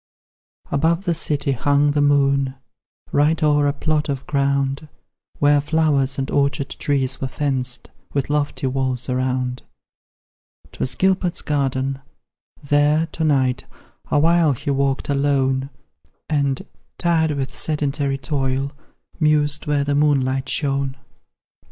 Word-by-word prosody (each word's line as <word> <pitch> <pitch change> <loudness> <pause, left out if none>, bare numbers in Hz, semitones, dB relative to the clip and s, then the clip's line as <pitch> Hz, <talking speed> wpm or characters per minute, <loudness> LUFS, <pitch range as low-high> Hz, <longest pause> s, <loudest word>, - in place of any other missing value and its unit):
Above 165 +6 +1
the 175 - +2
city 150 -3 -1
hung 145 +3 +2
the 145 0 +1
moon, 140 -2 +2 0.6
Right 150 +3 +2
o'er 145 -1 +3
a 140 - +1
plot 155 +1 -1
of 135 -2 -3
ground 140 +1 0 0.5
Where 145 0 +4
flowers 145 -3 +1
and 135 0 -3
orchard 140 -1 +1
trees 135 -2 -1
were 135 - -1
fenced 130 -2 -1 0.2
With 140 -2 -1
lofty 145 -2 -1
walls 130 -1 -1
around: 125 0 -1 1.1
'Twas 125 -1 -3
Gilbert's 185 0 +1
garden 135 -2 -1 0.6
there 145 +2 +3
to 160 - -3
night 130 -4 +1 0.4
Awhile 165 0 +3
he 140 +3 -3
walked 135 0 0
alone; 135 -1 +1 0.6
And, 140 -3 0 0.3
tired 165 -2 +2
with 135 -2 -3
sedentary 145 -2 -1
toil, 135 0 -1 0.5
Mused 150 -1 +2
where 145 -1 +1
the 145 0 -1
moonlight 135 -2 +1
shone. 140 -2 -1
140 Hz, 120 wpm, -21 LUFS, 135-150 Hz, 1.1 s, Where